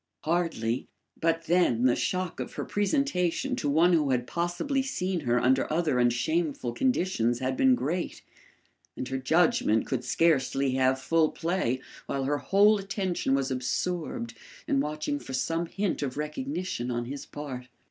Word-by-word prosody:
Hardly; 160 -9 -1 0.3
but 165 0 +1
then 165 -9 +2
the 125 -1 +4
shock 185 -2 -2
of - - -5
her - - -4
presentation 205 - 0
to 190 - -1
one 165 +5 +4
who 150 -4 +3
had 125 -2 +1
possibly 175 - -1
seen 190 -9 -2
her 125 -4 +1
under 130 +4 +2
other 155 -5 +1
and 120 0 +4
shameful 145 +1 -1
conditions 180 - +1
had 130 +1 -1
been 260 - +5
great, 175 - -3 0.7
and 130 - -4
her 135 0 -2
judgment 135 -6 +3
could 130 -3 -2
scarcely 135 0 +2
have 130 0 +2
full 155 +4 +2
play 165 -7 -1 0.3
while 135 - -1
her 145 +2 0
whole 205 +4 +4
attention 190 -8 -1
was 135 -1 -1
absorbed 180 - -2 0.3
in 280 -3 +2
watching 155 - -2
for 135 - -9
some 165 +6 -1
hint 195 0 -2
of 140 -2 -3
recognition 150 - -3
on 120 -1 -2
his 140 +3 -7
part. 130 -4 -7
155 Hz, 155 wpm, -28 LUFS, 130-180 Hz, 0.7 s, been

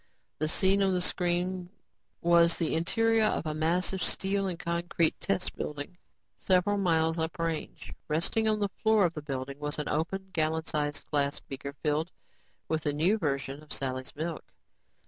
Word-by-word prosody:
The 155 - +1
scene 190 +5 +3
on 195 -1 +3
the 180 - +2
screens 180 0 0 0.5
was 170 0 +5
the 165 - 0
interior 225 +7 +3
of 210 - 0
a 155 - -1
massive 175 +4 0
steel 195 0 +1
and 180 -2 -3
concrete 170 -1 0
test 100 - -1
building 150 +4 -5 0.4
several 195 +2 +2
miles 165 -3 +2
up 160 0 -2
range. 165 -2 -3
Resting 170 +8 +1
on 215 0 +3
the 205 -1 +1
floor 220 -3 +5
of 170 - 0
the 150 - -5
building 135 -1 -5
was 150 0 -3
an 150 - -3
open, 190 +5 -2
gallon 160 0 0
sized 145 -2 -2
glass 140 -1 +1
beaker 140 +1 -7
filled 155 +3 +1 0.6
with 160 0 0
the 145 -1 0
new 175 +9 +2
version 140 -3 -2
of 155 - -16
Sally's 130 +1 -3
milk. 160 +2 -3
165 Hz, 165 wpm, -29 LUFS, 150-185 Hz, 0.6 s, was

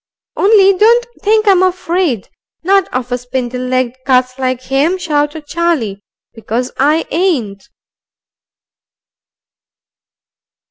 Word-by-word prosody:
"Only 395 -1 +4
don't 465 +5 +4 0.2
think 430 +1 +2
I'm 380 -2 +5
afraid, 355 - 0 0.4
not 390 +1 +2
of 250 0 -4
a 245 - -1
spindle 250 0 -4
legged 255 -1 -1
cuss 255 0 +1
like 255 -1 -2
him," 280 +8 0
shouted 295 -3 -2
Charlie. 290 -12 -1 0.3
"Because 230 +3 -4
I 300 +4 +2
ain't." 255 - -1
290 Hz, 100 wpm, -14 LUFS, 250-370 Hz, 0.4 s, I'm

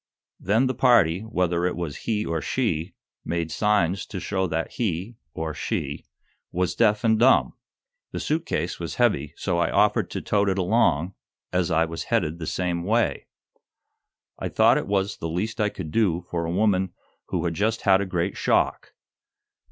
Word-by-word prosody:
Then 110 +7 +2
the 130 - 0
party, 100 -12 +4
whether 90 -6 -1
it 90 - -2
was 85 -5 -4
he 105 -2 0
or 80 -1 -2
she, 95 -9 -1 0.3
made 85 -2 -2
signs 100 -3 +1
to 95 - -5
show 95 +2 -1
that 80 0 -2
he, 105 +1 -3 0.2
or 80 -1 -3
she, 70 -1 -4 0.4
was 90 0 0
deaf 110 0 +2
and 110 -1 +3
dumb. 130 +3 +4 0.6
The - - -4
suit 160 +2 -1
case 85 +3 -2
was 85 -1 -5
heavy, 85 - +1
so 90 -3 -1
I 85 - +2
offered - - +2
to - - -4
tote 100 -1 +1
it 95 - 0
along, 90 -3 +2 0.4
as 90 -1 +1
I 80 -1 +3
was 85 0 -6
headed 80 +2 0
the 80 - -5
same 90 -2 -1
way. 115 +5 0 1.1
I - - -3
thought - - +4
it - - -6
was 100 0 0
the 80 - -4
least 105 +7 -2
I 105 - +2
could 85 -6 -7
do 90 -5 +1
for 85 -1 -1
a 85 - -2
woman 95 -1 +1 0.3
who - - -2
had 85 - 0
just 110 +6 0
had 95 -1 +4
a - - -1
great 90 -2 -1
shock. - - 0
90 Hz, 180 wpm, -25 LUFS, 85-105 Hz, 1.1 s, party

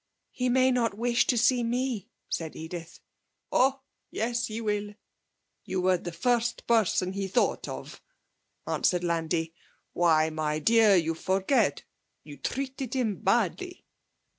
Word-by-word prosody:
'He 250 0 -1
may 260 +1 +4
not 230 -5 0
wish 235 +1 +2
to 245 - +2
see 245 +2 +3
me,' 240 -3 -2 0.2
said 160 -2 -4
Edith. 165 +1 -8 0.5
'Oh 270 +1 +3 0.3
yes, 235 +2 -1
he 220 +1 -5
will. 210 -2 -2 0.7
You 190 -3 -3
were 185 0 +3
the 175 - -6
first 240 +7 0
person 205 -5 +2
he 195 0 -3
thought 190 - 0
of,' - - -8 0.6
answered 180 -1 +1
Landi. 165 -1 -1 0.4
'Why, 160 -2 +3
my 155 -1 -1
dear, 220 +5 +5
you 165 -2 +2
forget 190 - +1 0.4
you 145 -1 -11
treated 265 -1 -4
him 225 -7 0
badly!' 240 - -1
210 Hz, 135 wpm, -28 LUFS, 175-245 Hz, 0.7 s, dear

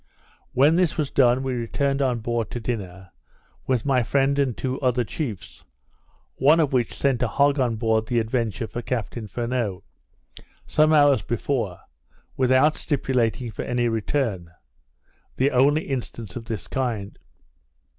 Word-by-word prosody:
When 145 +6 +4
this 180 -3 +1
was 150 -3 -1
done, 125 0 +3
we 130 -1 -2
returned 135 +4 -1
on 125 -4 0
board 120 0 -2
to 120 - -5
dinner, 95 -6 -5 0.6
with 125 -2 0
my 135 -3 +3
friend 135 +5 +1
and 130 -5 0
two 130 0 -3
other 125 -2 +2
chiefs; 115 - -6 0.7
one 150 +5 +5
of 150 -4 +1
which 120 -3 0
sent 135 -3 0
a 125 - +2
hog 140 +5 +2
on 120 -3 +1
board 110 -1 0
the 120 - 0
Adventure 115 0 -1
for 120 - -6
Captain 115 -2 -4
Furneaux, 115 -3 -3 0.8
some 155 0 +3
hours 145 -6 +5
before, 115 -3 -2 0.5
without 130 +4 +3
stipulating 125 -5 -1
for - - -6
any 120 -1 0
return. 110 -5 -1 0.9
The 135 +2 +2
only 145 +5 +3
instance 120 -6 -5
of 115 - -6
this 105 -7 -5
kind. 115 -6 -3
125 Hz, 145 wpm, -24 LUFS, 115-135 Hz, 0.9 s, one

